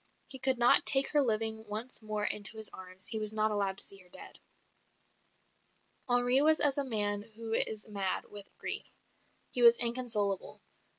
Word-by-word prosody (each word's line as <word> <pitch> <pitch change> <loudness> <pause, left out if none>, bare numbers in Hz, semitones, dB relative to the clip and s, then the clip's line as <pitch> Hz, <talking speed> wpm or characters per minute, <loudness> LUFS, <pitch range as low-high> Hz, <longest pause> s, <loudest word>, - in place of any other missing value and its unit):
He 265 - -7
could 265 -1 +1
not 240 0 +5
take 270 0 +6
her 295 - +3
living 220 -2 -1
once 220 +5 -5
more 215 -1 -4
into 210 +1 -2
his 220 -1 -4
arms; 185 0 -7
he 225 -3 -1
was 215 0 -4
not 215 0 0
allowed 200 -2 -2
to - - -1
see 195 - -8
her 180 -1 -20
dead. - - -12 1.7
Henri 245 +2 +3
was 310 +1 +4
as 285 -1 +5
a - - +1
man 205 -5 -2
who 225 0 -6
is 215 -1 -1
mad 200 -3 -3
with 205 -1 -9
grief; - - -6 0.6
he 245 - +1
was 235 0 +7
inconsolable.. 230 -5 0
220 Hz, 175 wpm, -31 LUFS, 205-245 Hz, 1.7 s, was